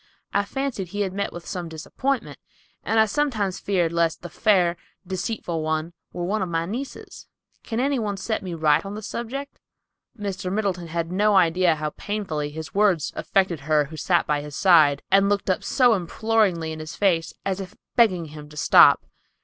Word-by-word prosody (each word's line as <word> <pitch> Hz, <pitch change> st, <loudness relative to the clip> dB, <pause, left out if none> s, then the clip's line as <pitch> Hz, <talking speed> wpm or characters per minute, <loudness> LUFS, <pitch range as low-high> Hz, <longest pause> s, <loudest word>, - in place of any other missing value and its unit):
I 200 Hz, 0 st, +2 dB
fancied 265 Hz, -5 st, -3 dB
he 205 Hz, +4 st, -4 dB
had 190 Hz, -2 st, -1 dB
met 200 Hz, +1 st, -2 dB
with 175 Hz, 0 st, -9 dB
some 175 Hz, -2 st, -5 dB
disappointment 250 Hz, -, -3 dB, 0.4 s
and 225 Hz, -, +1 dB
I 220 Hz, -, +6 dB
sometimes 215 Hz, -6 st, -1 dB
feared 175 Hz, -4 st, 0 dB
lest 170 Hz, -1 st, 0 dB
the 175 Hz, -, -7 dB
fair, 185 Hz, -6 st, +3 dB, 0.3 s
deceitful 185 Hz, -2 st, -3 dB
one 155 Hz, +2 st, -2 dB, 0.2 s
were 175 Hz, -, -5 dB
one 205 Hz, +4 st, -1 dB
of 185 Hz, -, -2 dB
my 165 Hz, 0 st, -1 dB
nieces. 245 Hz, +9 st, -7 dB, 0.3 s
Can 225 Hz, -1 st, -4 dB
any 275 Hz, +1 st, +1 dB
one 205 Hz, -3 st, -2 dB
set 220 Hz, +3 st, -2 dB
me 180 Hz, -3 st, -5 dB
right 155 Hz, -2 st, +3 dB
on 200 Hz, +1 st, -6 dB
the 215 Hz, -, -7 dB
subject?" 270 Hz, +7 st, -5 dB, 0.6 s
Mr. 195 Hz, -3 st, -4 dB
Middleton 190 Hz, -4 st, -1 dB
had 165 Hz, +1 st, -3 dB
no 205 Hz, +2 st, +3 dB
idea 180 Hz, -1 st, +4 dB
how 150 Hz, 0 st, -3 dB
painfully 185 Hz, -9 st, -3 dB
his 155 Hz, -1 st, -8 dB
words 195 Hz, -6 st, +2 dB
affected 185 Hz, -5 st, 0 dB
her 150 Hz, +1 st, +2 dB
who 155 Hz, +3 st, -10 dB
sat 170 Hz, +4 st, +1 dB
by 150 Hz, -2 st, 0 dB
his 145 Hz, -1 st, -8 dB
side, 155 Hz, -7 st, +5 dB
and 195 Hz, +1 st, +5 dB
looked 200 Hz, -1 st, +1 dB
up 185 Hz, -, -2 dB
so 250 Hz, -4 st, +4 dB
imploringly 195 Hz, -3 st, 0 dB
in 155 Hz, -, -6 dB
his 155 Hz, 0 st, -7 dB
face, 170 Hz, -5 st, +1 dB
as 195 Hz, -1 st, -1 dB
if 190 Hz, +1 st, -8 dB, 0.2 s
begging 190 Hz, -8 st, +3 dB
him 150 Hz, -1 st, -11 dB
to 150 Hz, -, -13 dB
stop. -, -, +6 dB
185 Hz, 190 wpm, -24 LUFS, 165-210 Hz, 0.6 s, I